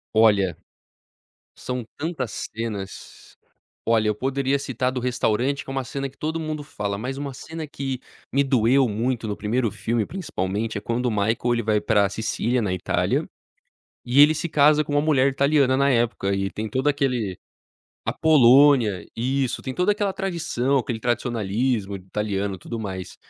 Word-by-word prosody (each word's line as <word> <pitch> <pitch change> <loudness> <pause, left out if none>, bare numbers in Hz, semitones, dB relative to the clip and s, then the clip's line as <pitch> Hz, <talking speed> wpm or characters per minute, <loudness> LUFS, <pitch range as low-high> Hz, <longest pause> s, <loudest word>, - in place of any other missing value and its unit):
Olha, 100 -6 +4 1.0
são 125 -1 -4
tantas 145 -7 -4
cenas. 105 -4 -7 0.5
Olha, 115 -1 +3
eu - - +2
poderia 135 +3 0
citar 130 -2 -1
a - - -3
do 130 - -3
restaurante, 125 +2 0
que - - -12
é - - -4
uma 135 -1 -1
cena 140 +3 -4
que 135 - -23
todo 160 +2 -2
mundo 155 -2 -4
fala, 100 -7 -4
mas 125 +6 -4
uma 140 -1 -4
cena 160 +4 -7
que 135 -3 -4 0.3
me 140 +1 +3
doeu 130 0 +3
muito, 115 +2 -1
no 105 - -2
1º 110 +2 -1
filme 110 +2 -1
principalmente, 110 - -3
é - - -5
quando 120 +3 -1
o - - +1
Michael, 110 +2 +1 0.2
ele 115 0 -1
vai 105 -1 +1
para 105 -2 +3
a - - -1
Sicília, 115 +4 -1
na 100 -4 -1
Itália, 90 -1 0 0.8
e 125 +3 +4
ele 150 +2 +7
se 165 +2 -3
casa 150 0 +5
com 145 - -5
uma 145 - +3
mulher 145 -3 +3
italiana 140 -1 +3
na 140 0 +3
época, 115 -5 +1
e 95 0 -1
tem 110 +2 -4
todo 130 +6 0
aquele 125 - 0 0.7
a - - -1
Polônia, 130 - +5
isso. 130 +2 -1
Tem 130 - -4
toda 180 +7 +2
aquela 205 -2 -1
tradição, 170 -9 -1
aquele 120 -2 -3
tradicionalismo 115 -2 -1
italiano, 100 0 -3
tudo 115 +5 -6
mais. 95 -3 -6
125 Hz, 175 wpm, -23 LUFS, 105-140 Hz, 1.0 s, ele